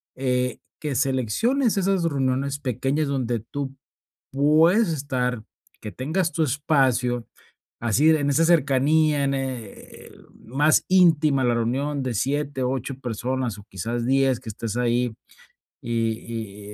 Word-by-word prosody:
eh, 125 -2 -1 0.2
que 150 -3 -3
selecciones 140 - +1
esas 195 -2 +1
reuniones 140 -2 -1
pequeñas 135 +3 -1
donde 125 -4 -1
tú 135 +3 -6 0.6
puedes 160 - +4
estar, 130 -6 -2 0.4
que 105 - -6
tengas 160 - -1
tu 165 - 0
espacio, 130 -4 +1 0.5
así 120 +7 +3
en 145 -2 +2
esa 150 +4 +3
cercanía, 150 -1 +3
en 140 0 +1
e 130 -3 -3
e - - -14
el - - -17 0.2
más 145 +6 +3
íntima 160 -7 +4
la 120 -1 +2
reunión 135 +5 -1
de 130 -2 -2
7, 140 +4 -1
8 130 +1 -2
personas 125 -1 -3
o 105 - -12
quizás 115 +5 -3
10 135 -1 +2
que 120 -3 -9
estés 115 +2 -5
ahí 120 -1 0 0.7
y 115 -3 -4
135 Hz, 135 wpm, -24 LUFS, 120-150 Hz, 0.7 s, puedes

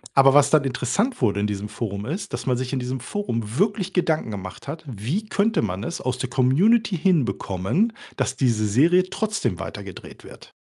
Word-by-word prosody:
Aber, 135 0 +7
was 145 -1 +6
dann 155 -2 +4
interessant 135 - -1
wurde 100 -4 +2
in 105 - +1
diesem 105 0 -4
Forum, 105 -2 -4
ist, 195 - -5
dass - - -4
man 125 -2 +1
sich 130 +1 -4
in 130 - 0
diesem 125 +1 -3
Forum 120 - -4
wirklich 200 -1 0
Gedanken 160 - +1
gemacht 95 +4 -8
hat: 160 +3 -6
Wie 130 - -3
könnte 215 +2 +1
man 100 -1 -3
es - - -4
aus 130 0 -2
der 130 -1 -3
Community 175 - +3
hinbekommen, 160 - +1 0.2
dass - - -1
diese 115 -5 +1
Serie 170 - +4
trotzdem 215 0 -2
weitergedreht - - -8
wird? - - -14
135 Hz, 185 wpm, -23 LUFS, 115-185 Hz, 0.2 s, Aber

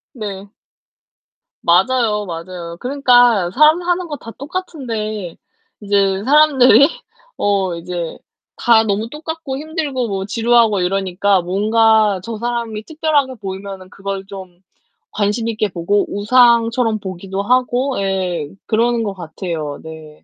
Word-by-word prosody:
네. 205 -2 -7 1.1
맞아요, 210 +3 +2
맞아요. 170 0 -7
그러니까 245 -7 +3
사람 305 - +5
사는 355 0 -1
거 295 - -4
다 230 - -10
똑같은데 235 - -5 0.4
이제 200 -2 +1
사람들이 280 -1 +6 0.5
어 195 -3 0
이제 175 -1 -5 0.4
다 230 -2 +4
너무 215 +2 -2
똑같고 310 -2 -6
힘들고 295 -6 -3
뭐 195 -1 -3
지루하고 230 -2 +2
이러니까 190 +1 +1
뭔가 215 +2 +2
저 225 +2 -6
사람이 235 -2 -3
특별하게 300 -4 0
보이면은 195 -2 -7
그걸 195 0 -6
좀 185 -3 -11 0.5
관심 215 +3 -1
있게 215 -1 -1
보고 185 +3 0
우상처럼 230 +1 +3
보기도 190 +1 -5
하고 250 +1 +1
예 185 -5 -2 0.2
그러는 230 +1 +1
것 200 -3 -3
같아요. 165 -4 -5
네. 160 -1 -11
210 Hz, 265 characters per minute, -18 LUFS, 190-245 Hz, 1.1 s, 사람들이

